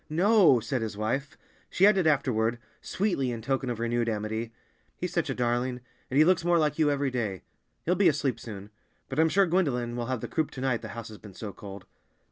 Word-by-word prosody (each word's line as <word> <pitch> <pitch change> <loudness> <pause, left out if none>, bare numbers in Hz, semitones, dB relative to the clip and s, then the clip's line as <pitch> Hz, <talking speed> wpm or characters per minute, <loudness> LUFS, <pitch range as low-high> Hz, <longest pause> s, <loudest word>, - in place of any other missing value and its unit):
"No," 180 - +5
said 130 +2 -2
his 110 -2 -4
wife. 130 +7 -2 0.3
She 190 - +3
added 195 -5 +4
afterward, 120 -6 +1 0.2
sweetly 185 -10 -1
in 115 -2 -5
token 135 0 -1
of 120 -2 -3
renewed 120 0 0
amity, 110 +1 -3 0.5
"He's 180 0 -4
such 170 -4 0
a 135 - -1
darling, 125 +1 0 0.3
and 130 - -1
he 155 - +7
looks 180 -1 +3
more 175 0 +3
like 150 -1 +1
you 155 -2 +4
every 140 -1 0
day. 110 -7 -3 0.4
He'll 175 - +2
be 185 +1 +4
asleep 135 -6 -1
soon. 105 -2 -9 0.4
But 135 +2 -3
I'm 160 0 +5
sure 195 +4 +4
Gwendolen 135 -10 0
will 120 -1 -3
have 130 -3 -2
the 120 - -4
croup 155 +6 -1
to 130 - -7
night, 130 -3 0
the 110 - -7
house 115 -1 -6
has 105 - -11
been 105 -4 -13
so 105 -2 -6
cold." 100 -2 -10
130 Hz, 220 wpm, -28 LUFS, 115-160 Hz, 0.5 s, he